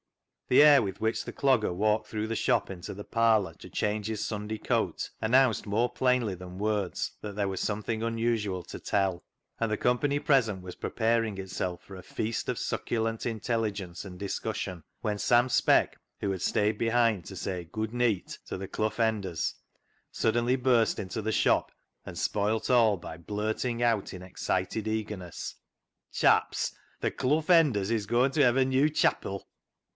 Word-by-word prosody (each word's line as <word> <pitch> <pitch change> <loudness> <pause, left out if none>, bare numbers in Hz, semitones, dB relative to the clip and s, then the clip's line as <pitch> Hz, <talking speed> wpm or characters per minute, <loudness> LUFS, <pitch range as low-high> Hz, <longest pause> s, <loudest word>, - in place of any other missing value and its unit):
The 130 - +7
air 145 -3 +8
with 95 -4 -4
which 110 +1 0
the - - -6
Clogger 130 -9 +2
walked 105 +3 +1
through 110 0 -2
the 115 - -2
shop - - +1
into 90 -3 -6
the 105 +1 -8
parlour 110 -6 +2
to - - -11
change 105 +2 -1
his 110 -2 -2
Sunday 105 0 -4
coat - - -1
announced 120 +1 +3
more 115 +4 +1
plainly 125 -5 +1
than 90 0 -10
words 105 -2 -1
that 105 -2 -6
there 100 -1 0
was 95 -1 -3
something 110 +1 -2
unusual 115 -5 -1
to - - -8
tell, 95 -3 0 0.4
and 115 -1 0
the 105 - +1
company 140 +4 +1
present 115 -10 +2
was 90 -1 -8
preparing 115 -2 0
itself 95 -2 -4
for 95 - -11
a 95 - -10
feast 110 +1 -3
of - - -1
succulent 115 -1 -2
intelligence 110 -5 -2
and 90 -2 -10
dis 100 -1 -3
cussion 95 -6 -4 0.2
when 105 -1 -2
Sam 120 +3 +4
Speck, 125 - +3 0.2
who 100 - -1
had 95 -2 -4
stayed 105 +2 +1
behind 115 -4 +2
to 95 - -8
say 90 -3 -4
" - - -38
Good 110 0 -3
neet 120 -6 0
" - - -50
to - - -4
the 95 +1 -6
Clough 110 +2 -2
Enders, 105 -8 0 0.6
suddenly 120 +3 +1
burst 125 -3 +2
into 95 +3 -4
the 110 +1 -1
shop - - +2 0.3
and - - -8
spoilt 105 +2 0
all 115 -5 +5
by 80 -1 -8
blurting 110 +6 -2
out 115 -4 +1
in 90 -1 -8
excited 95 +3 -2
eagerness 105 -5 -4 0.2
— - - -58
" - - -59
Chaps! - - +2 0.3
th' - - -1
Clough 150 +4 +1
Enders 140 - +4
is 110 -3 0
goin' 120 +4 +3
ta 150 - +2
hev' 125 -2 +4
a 130 - +4
new 130 +3 +3
chapil." 100 -9 0
110 Hz, 180 wpm, -29 LUFS, 100-115 Hz, 0.6 s, air